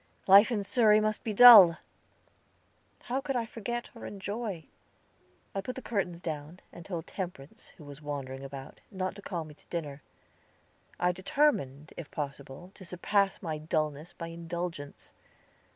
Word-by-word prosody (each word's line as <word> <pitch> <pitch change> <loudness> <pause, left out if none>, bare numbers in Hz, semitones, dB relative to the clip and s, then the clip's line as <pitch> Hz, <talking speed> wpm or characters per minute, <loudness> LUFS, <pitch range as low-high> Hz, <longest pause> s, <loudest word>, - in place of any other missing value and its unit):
Life 200 +3 +8
in 210 -4 0
Surrey 215 -1 +4
must 215 0 -1
be 220 - -2
dull. 210 -7 +10 1.3
How 260 +3 -2
could 275 -1 -3
I 235 -2 0
forget 240 +2 -5
or 230 - -9
enjoy? 200 -3 -5 0.9
I 195 - -2
put 250 +6 -6
the 260 - -6
curtains 180 -6 -2
down, 155 +1 -6
and 170 - -10
told 170 -2 -5
Temperance, 175 -7 -7
who - - -13
was 145 0 -11
wandering 135 -2 -6
about, 135 -1 -9
not 185 -2 -3
to - - -10
call 175 -4 -4
me 155 - -12
to - - -25
dinner. 150 -4 -5 1.0
I 180 0 +2
determined, 175 - 0
if 170 - -8
possible, 140 +4 -7
to 190 - -13
surpass 195 +3 0
my 160 -3 -3
dullness 155 0 -2
by 165 -1 -7
indulgence. 170 -3 -6
175 Hz, 150 wpm, -29 LUFS, 150-210 Hz, 1.3 s, dull